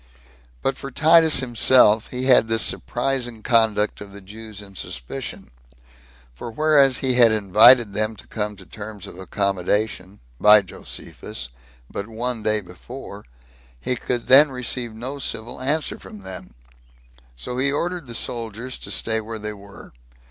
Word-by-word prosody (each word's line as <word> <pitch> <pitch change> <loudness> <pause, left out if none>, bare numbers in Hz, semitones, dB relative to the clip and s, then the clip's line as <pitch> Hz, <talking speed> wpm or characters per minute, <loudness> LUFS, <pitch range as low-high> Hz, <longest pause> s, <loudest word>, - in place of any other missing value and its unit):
But 135 - 0
for 135 - -7
Titus 160 +1 +5
himself, 120 -3 +4
he 125 0 -5
had 125 -4 +5
this 115 0 +2
surprising 120 -3 -2
conduct 110 -4 +1
of 100 -1 -10
the 100 - -10
Jews 105 +2 -10
in 100 -2 -12
suspicion; - - -7 0.8
for 65 - -8
whereas 140 0 +3
he 130 - +2
had 120 -2 +5
invited 110 +2 +5
them 110 +2 -1
to - - -10
come 105 -1 -4
to 95 -2 -14
terms 105 -1 -9
of - - -11
accommodation, 100 +1 -2 0.2
by 105 -1 +7
Josephus, 65 -7 -8 0.4
but 100 - -6
one 115 +1 -4
day 110 0 +1
before, 100 +4 -11 0.5
he 125 - -2
could 120 0 -3
then 140 +3 +7
receive 125 -2 -4
no 130 +5 -6
civil 120 -2 -5
answer 150 +4 -1
from 105 - -12
them; 95 -1 -9 0.8
so 95 - -5
he 140 +1 +3
ordered 175 +1 -3
the 120 - -7
soldiers 115 +2 -5
to - - -9
stay 110 0 0
where 110 +1 -7
they 105 0 -6
were. 100 -7 -14
110 Hz, 150 wpm, -22 LUFS, 105-125 Hz, 0.8 s, by